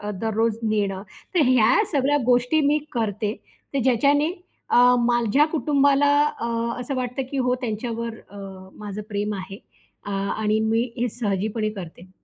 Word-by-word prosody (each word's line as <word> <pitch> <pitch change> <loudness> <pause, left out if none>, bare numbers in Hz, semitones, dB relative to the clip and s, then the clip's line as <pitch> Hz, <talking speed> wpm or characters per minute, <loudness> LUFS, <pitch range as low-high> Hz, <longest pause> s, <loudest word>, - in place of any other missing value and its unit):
अ, 205 0 -4
दररोज 225 0 0
नेणं 200 -3 -1 0.3
तर 330 - +4
ह्या 245 -2 +4 0.2
सगळ्या 285 +1 +2
गोष्टी 250 +5 +3
मी 295 +1 +3
करते. 215 -2 -2 0.4
तर - - +1
ज्याच्याने 285 +6 +3 0.4
अ, - - +3 0.3
माझ्या 240 +3 +3
कुटुंबाला 285 -2 +3 0.3
अ, 235 - -2 0.3
असं 250 +3 -4
वाटतं, 250 +1 -2
की 275 - -3
हो 250 -1 +1
अ, - - +1
त्यांच्यावर 230 0 -4 0.2
अ, 205 - -12 0.4
माझं 210 0 -6
प्रेम 205 0 -2
आहे 195 +1 -7 0.5
अ, - - -4
आणि 210 +2 0
मी 225 +1 +1 0.2
हे 245 - 0
सहजीपणे 215 0 -1
करते. 175 +1 -10
230 Hz, 150 wpm, -23 LUFS, 210-255 Hz, 0.5 s, तर